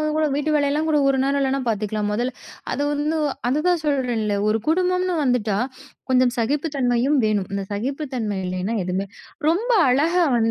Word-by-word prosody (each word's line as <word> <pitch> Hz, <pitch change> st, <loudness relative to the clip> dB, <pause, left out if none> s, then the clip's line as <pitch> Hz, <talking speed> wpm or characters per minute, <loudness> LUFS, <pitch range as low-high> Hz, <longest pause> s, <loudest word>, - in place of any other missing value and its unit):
உன் 305 Hz, 0 st, -1 dB
கூட 310 Hz, 0 st, +2 dB
வீட்டு 295 Hz, +2 st, -1 dB
வேலை 285 Hz, -1 st, +2 dB
எல்லாம் 310 Hz, +2 st, 0 dB
கூட 300 Hz, -1 st, +3 dB
ஒரு 270 Hz, -1 st, +2 dB
நேரம் 280 Hz, 0 st, +1 dB
இல்லைன்னா 270 Hz, 0 st, 0 dB
பார்த்துக்கலாம். 210 Hz, -1 st, -1 dB
முதல்ல" 245 Hz, +4 st, -1 dB, 0.4 s
அது 285 Hz, -, -1 dB
வந்து 300 Hz, +2 st, -1 dB, 0.3 s
அதுதான் 315 Hz, +4 st, +1 dB
சொல்றேன்ல, 245 Hz, -7 st, 0 dB
ஒரு 220 Hz, +1 st, +2 dB
குடும்பம்னு 365 Hz, +1 st, +1 dB
வந்துட்டா 220 Hz, -6 st, +1 dB, 0.5 s
கொஞ்சம் 255 Hz, -1 st, +3 dB
சகிப்பு 280 Hz, +7 st, 0 dB
தன்மையும் 255 Hz, +2 st, +2 dB
வேணும். 205 Hz, -3 st, 0 dB
அந்த 195 Hz, -, -2 dB
சகிப்புத்தன்மை 245 Hz, -2 st, -3 dB
இல்லைன்னா 185 Hz, +5 st, -2 dB
எதுமே 185 Hz, +2 st, -2 dB, 0.4 s
ரொம்ப 435 Hz, +9 st, 0 dB, 0.2 s
அழகா 330 Hz, +7 st, +3 dB
வந் 225 Hz, -1 st, +2 dB
265 Hz, 165 wpm, -22 LUFS, 220-305 Hz, 0.5 s, கூட